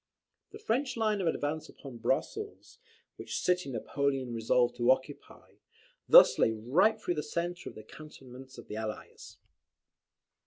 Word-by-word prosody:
The 425 - -11
French 265 - -2
line 215 -3 0
of 180 - -1
advance 155 0 -2
upon 135 -4 -11
Brussels, 425 - -3 0.4
which - - -5
city 180 -4 0
Napoleon 135 +1 -2
resolved 120 +2 +1
to 120 +1 +1
occupy, 130 +2 -2 0.5
thus - - +8
lay 110 - +3
right 165 - +2
through 175 - -2
the 150 - -3
centre 175 +3 -4
of - - -15
the 110 - -10
cantonments 130 -1 -13
of 120 - -12
the 105 - -6
Allies. 110 -1 -7
140 Hz, 145 wpm, -30 LUFS, 125-180 Hz, 0.5 s, thus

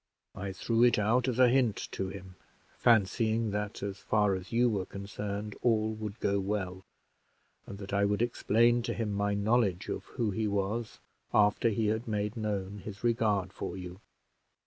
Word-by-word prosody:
I 100 0 -5
threw 115 +5 +1
it 125 - +5
out 115 +5 +2
as 125 -2 -1
a 130 -1 +7
hint 120 -4 +2
to 95 - -3
him, 95 -1 -9 0.4
fancying 110 0 +2
that, 105 0 -3
as 100 -1 -4
far 105 0 +2
as 95 0 -5
you 120 +1 +3
were 100 -5 -1
concerned, 100 +1 -5
all 110 -2 +2
would 110 0 -6
go 100 -1 +1
well, 95 -2 -3 0.8
and 100 - -7
that 100 -1 -8
I 100 0 +3
would 105 +3 +1
explain 120 0 +3
to 120 - -3
him 110 -2 -2
my 100 0 0
knowledge 100 -3 +1
of - - -4
who 115 -3 -2
he 110 +2 -1
was, 105 +3 -2 0.4
after 105 +2 +4
he 110 +1 0
had 110 +3 -2
made 105 0 -1
known 105 -3 -3
his 100 +1 -9
regard 105 -5 +1
for 90 - -5
you." 90 0 -8
105 Hz, 175 wpm, -30 LUFS, 100-115 Hz, 0.8 s, a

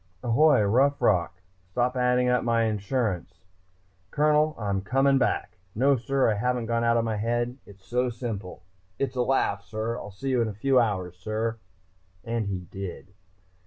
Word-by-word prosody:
"Ahoy, 125 +1 +4
Rough 135 +8 +3
Rock! 90 -6 +1 0.3
Stop 125 +6 0
adding 125 0 +2
up 125 0 +2
my 115 -1 +2
insurance, 105 -5 -2 0.7
Colonel! 150 +2 +2
I'm 100 -3 -1
coming 135 +6 +2
back.... - - -1 0.2
No, 135 +5 +4
sir, 135 +3 +1
I - - +2
haven't 125 +1 0
gone 115 +1 0
out 115 0 +3
of 115 - +1
my 110 -2 -1
head, 120 +4 -1
sir. - - -19
It's 95 -1 -16
so 125 +1 0
simple 110 -7 -6 0.3
it's 135 -2 -2
a 125 - +1
laugh, 120 -6 +1
sir.... 110 +3 -4
See 135 +8 -5
you 125 -2 +2
in 115 - +1
a 105 - -6
few 130 +5 +3
hours, 95 -6 -1
sir!" 110 +4 -3 0.6
And 115 -3 -2
he 95 -2 -3
did. 95 +1 -8
115 Hz, 170 wpm, -26 LUFS, 100-125 Hz, 0.7 s, Ahoy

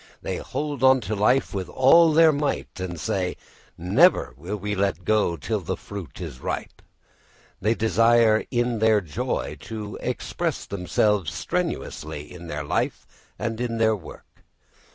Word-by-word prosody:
They - - -3
hold 145 -3 -4
on 130 0 +6
to 110 0 -3
life 125 +6 +2
with 95 -3 -4
all 160 +6 +6
their 160 +1 +6
might 145 -7 -2
and 90 -2 -5
say, 90 +2 -2 0.4
"never 100 - +3
will 85 +10 -5
we 105 +1 -3
let 100 -3 -1
go 105 -6 +2
till 70 - -2
the - - -4
fruit 100 -9 -9
is 65 - -7
ripe." - - -5 0.8
They 110 +4 +2
desire 115 0 +4
in 120 -2 0
their 110 -1 +4
joy 75 -6 -3
to 105 -2 -7
express - - -3
themselves 100 -1 0
strenuously 90 - -4
in 85 -1 -10
their - - -4
life - - -1 0.3
and 115 0 -3
in 115 -2 -2
their 110 -1 +3
work. 85 -7 -13
110 Hz, 150 wpm, -24 LUFS, 90-120 Hz, 0.8 s, on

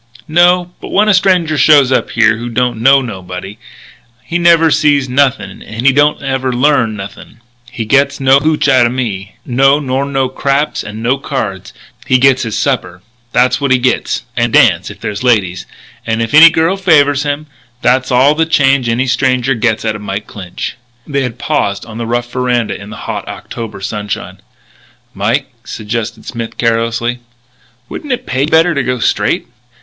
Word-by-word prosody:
"No. 175 +2 +3
But - - -8
when 210 +2 +2
a - - +5
stranger 180 -5 +2
shows 145 -4 +5
up - - +1
here 110 -2 +2
who 120 +1 -6
don't 120 -1 -1
know 135 +2 +5
nobody, 95 -2 -8 0.6
he 165 +7 -2
never 165 -2 +4
sees 145 -3 +2
nothing 135 +1 0
and 115 +3 -7
he 135 - +5
don't 145 +2 +2
never 135 -1 -2
learn 125 -3 +1
nothing. 100 +3 -10 0.3
He 115 -2 -5
gets 140 +4 +2
no 135 0 +4
hootch 150 0 0
outa 130 -3 +4
me. 110 -7 -4
No, 135 +3 +3
nor 135 -1 -2
no 135 -2 0
craps 140 +3 -1
and 110 +1 -8
no 130 +3 +1
cards. 100 -10 -4 0.4
He 130 - +4
gets 130 0 +3
his 115 -2 -3
supper; 115 -11 -2 0.3
that's 125 +2 +2
what 140 - 0
he 130 - +4
gets... 125 +1 -1
and 120 -2 0
a - - +8
dance, - - +2
if - - -11
there's 105 - -5
ladies 100 -8 0 0.4
and 115 0 -2
if 115 -1 -3
any 160 +2 +9
girl 165 +4 0
favours 145 -7 +3
him. 145 +1 -3 0.4
That's 130 +2 +2
all 130 +4 +4
the 160 +1 0
change 135 -5 +2
any 120 +3 0
stranger 130 0 +1
gets 115 -2 -1
out 110 -1 -1
of 105 - -8
Mike 105 0 -5
Clinch." 95 +3 -7 0.3
They 140 -2 -2
had 125 -2 -4
paused 100 -8 -2
on 115 0 -9
the 115 - -4
rough 120 0 -2
veranda 125 -3 -1
in 100 - -10
the 105 - -9
hot - - -5
October 110 -4 -8
sunshine. 105 0 -5 0.7
"Mike," 120 +7 -1
suggested 115 +1 -5
Smith 115 -2 -6
carelessly, 115 +1 -1 0.7
"wouldn't 290 - -5
it 250 - -5
pay 130 +1 -2
you 140 - +1
better 165 +2 +3
to 140 - 0
go 125 0 -2
straight?" 115 - 0
130 Hz, 180 wpm, -13 LUFS, 115-140 Hz, 0.7 s, any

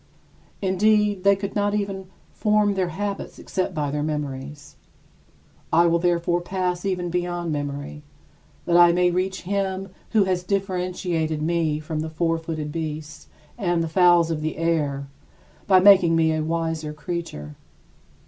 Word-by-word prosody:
Indeed, 205 +1 +2
they 200 0 +5
could 200 0 -5
not 205 0 +1
even 195 -2 -3 0.2
form 210 -1 +2
their 190 -2 0
habits 200 +4 -4
except 185 -1 -3
by 145 -2 -1
their 150 0 -2
memories. 145 -1 -5 1.0
I 170 +1 +5
will 170 0 +3
therefore 175 0 +1
pass 180 0 -2
even 180 -2 -2
beyond 175 -1 -2
memory 145 0 -4 0.6
that 170 - +1
I 175 0 +7
may 180 0 +3
reach 185 +2 -2
Him 195 0 -2 0.2
who 215 -3 +3
has 185 -2 0
differentiated 180 -5 -2
me 160 -2 0
from 155 0 -4
the 160 +1 -3
four 165 +1 0
footed 155 -2 -5
beasts 155 -1 -6 0.3
and 175 -4 +1
the - - -2
fowls 175 0 +4
of 155 -2 -2
the 155 0 -3
air 150 -4 0 0.6
by 190 -2 +6
making 185 -3 +6
me 160 -1 +3
a 155 - -1
wiser 160 -1 -2
creature. 150 - -6
170 Hz, 150 wpm, -23 LUFS, 155-190 Hz, 1.0 s, I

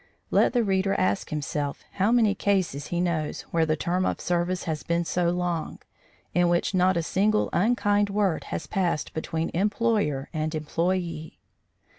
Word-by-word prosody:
Let - - +4
the 240 -2 +3
reader 195 -1 +1
ask 95 +2 0
himself 150 -1 -3
how 200 +3 +1
many 225 -4 +4
cases 185 -8 0
he 175 - -2
knows 170 -4 -1
where 165 -1 +2
the 155 - +2
term 180 +4 -1
of - - -1
service 175 +1 -1
has 160 -3 -3
been 170 0 -1
so 175 0 +1
long, 175 -2 -2 0.6
in 175 -1 +3
which 175 +3 +1
not 185 -1 +3
a 170 - 0
single 210 +5 +1
unkind 205 0 +2
word 200 -4 0
has - - -4
passed 175 -6 -1
between 160 +1 -3
employer 205 -7 +1
and 155 0 -2
employee. 165 +1 -2
175 Hz, 160 wpm, -26 LUFS, 160-195 Hz, 0.6 s, Let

